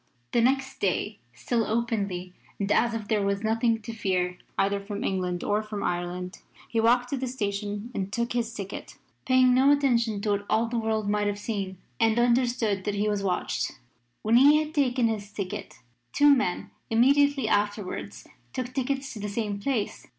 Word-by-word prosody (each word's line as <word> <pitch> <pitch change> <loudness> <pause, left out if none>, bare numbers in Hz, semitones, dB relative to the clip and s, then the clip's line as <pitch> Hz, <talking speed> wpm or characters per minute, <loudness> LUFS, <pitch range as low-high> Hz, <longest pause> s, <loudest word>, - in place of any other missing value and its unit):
The 235 - +3
next 265 +2 +1
day, 200 +2 -1 0.2
still 235 -2 0
openly 205 -6 -2 0.3
and 200 0 -1
as 235 +1 +3
if 215 -2 -5
there 215 -2 +1
was 200 +1 -1
nothing 225 0 +1
to 230 - -6
fear, 180 -4 -1 0.2
either 200 +1 +2
from 200 +1 -5
England 180 -2 -1
or 205 +1 +1
from 215 -1 -5
Ireland, 180 +1 -3 0.3
he 230 - -1
walked 245 +2 +3
to 280 - -1
the 260 0 -2
station 205 -1 -3
and 195 -2 -3
took 235 +2 -1
his 235 -1 -1
ticket, 200 -4 -7 0.3
paying 255 -1 +5
no 265 +3 +5
attention 240 -7 +2
to 210 - 0
what 205 0 -1
all 220 +2 +3
the 235 0 -2
world 220 -2 -1
might 210 0 +1
have 205 0 -1
seen 200 -3 -4 0.2
and 225 0 +3
understood 240 -4 +2
that 205 - -1
he 205 +1 0
was 205 -1 0
watched. 185 -2 -1 0.5
When 225 +2 +4
he 290 +4 +7
had 310 0 -2
taken 255 -5 +2
his 210 -2 -3
ticket 200 -3 -5 0.4
two 290 0 +6
men 180 -9 -2 0.2
immediately 275 +2 +4
afterwards 205 - -2 0.3
took 255 0 -4
tickets 270 +1 -2
to 220 - -8
the 205 0 -3
same 205 -1 -2
place. 230 -2 -2
220 Hz, 180 wpm, -27 LUFS, 200-245 Hz, 0.5 s, he